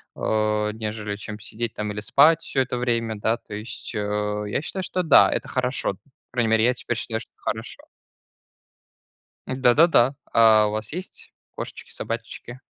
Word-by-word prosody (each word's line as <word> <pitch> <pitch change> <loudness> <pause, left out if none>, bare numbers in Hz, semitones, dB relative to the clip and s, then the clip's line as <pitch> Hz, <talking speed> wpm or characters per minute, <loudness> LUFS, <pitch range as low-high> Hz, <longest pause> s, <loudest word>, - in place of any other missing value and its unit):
а, 105 -1 0
нежели, 105 -1 -4
чем 105 +1 -8
сидеть 115 +2 -4
там 105 0 -3
или 105 - -5
спать 150 +9 +5
всё 135 - 0
это 125 -1 -2
время, 115 -2 -1
да. 110 +3 0
То 105 - -13
есть, 110 +3 -6
э, 105 0 -1
я 105 - -1
считаю, 190 +3 -4
что 185 0 -1
да, 160 -4 +7
это - - -2
хорошо. 130 -3 -1
По 100 - -20 0.3
крайней 115 -3 +1
мере, 110 0 +4
я 125 - +4
теперь 120 -1 -3
считаю, 110 -2 -2
что - - -10
хорошо. - - -4 1.7
Да-да-да. 130 +1 +4 0.2
А 110 -2 +6
у - - -2
вас 110 0 -4
есть 185 +3 -7 0.2
кошечки, - - -7
собачечки? 120 +2 -6
115 Hz, 165 wpm, -24 LUFS, 105-125 Hz, 1.7 s, да